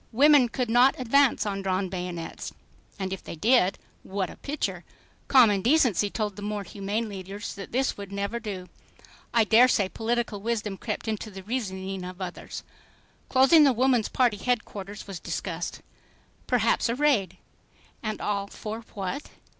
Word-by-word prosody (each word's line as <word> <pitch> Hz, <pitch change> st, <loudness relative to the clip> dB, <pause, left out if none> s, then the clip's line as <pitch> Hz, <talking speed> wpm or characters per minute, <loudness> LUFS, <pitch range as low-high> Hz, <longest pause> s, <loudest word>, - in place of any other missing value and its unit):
Women 275 Hz, +1 st, +6 dB
could 250 Hz, +1 st, -2 dB
not 245 Hz, +5 st, +4 dB
advance 260 Hz, +1 st, +3 dB
on 195 Hz, -1 st, -2 dB
drawn 190 Hz, 0 st, 0 dB
bayonets. 180 Hz, -2 st, -5 dB, 0.4 s
And 190 Hz, -1 st, -3 dB
if 190 Hz, -, -7 dB
they -, -, -7 dB
did... 210 Hz, +1 st, +3 dB, 0.2 s
What 190 Hz, -1 st, -3 dB
a -, -, -11 dB
picture! 295 Hz, +2 st, -3 dB, 0.4 s
Common 225 Hz, -7 st, +6 dB
decency 235 Hz, -, +3 dB
told 210 Hz, -1 st, -2 dB
the 205 Hz, -, -9 dB
more 205 Hz, 0 st, -3 dB
humane 205 Hz, +4 st, -3 dB
leaders 200 Hz, +1 st, -6 dB
that 200 Hz, -2 st, -9 dB
this 265 Hz, +3 st, 0 dB
would 200 Hz, -1 st, -8 dB
never 200 Hz, +4 st, -2 dB
do. 195 Hz, -5 st, -6 dB, 0.6 s
I 230 Hz, -1 st, +4 dB
daresay 220 Hz, -2 st, +5 dB
political 225 Hz, -2 st, -2 dB
wisdom 215 Hz, -3 st, -2 dB
crept 215 Hz, +1 st, -4 dB
into 220 Hz, 0 st, -3 dB
the 190 Hz, -2 st, -9 dB
reasoning 190 Hz, -4 st, -3 dB
of 180 Hz, +1 st, -8 dB
others. 180 Hz, -2 st, -6 dB, 0.7 s
Closing 270 Hz, +4 st, +6 dB
the 275 Hz, -3 st, +5 dB
Woman's 250 Hz, -2 st, +2 dB
Party 245 Hz, -5 st, +2 dB
headquarters 205 Hz, -3 st, -3 dB
was 195 Hz, -3 st, -7 dB
discussed. -, -, -4 dB, 0.6 s
Perhaps 235 Hz, -1 st, +2 dB
a 235 Hz, -, 0 dB
raid! 235 Hz, -, +2 dB, 0.6 s
And 215 Hz, -1 st, -3 dB
all 200 Hz, -1 st, -1 dB
for 215 Hz, +2 st, -6 dB, 0.2 s
what? 200 Hz, +8 st, -4 dB
210 Hz, 155 wpm, -27 LUFS, 195-245 Hz, 0.7 s, Women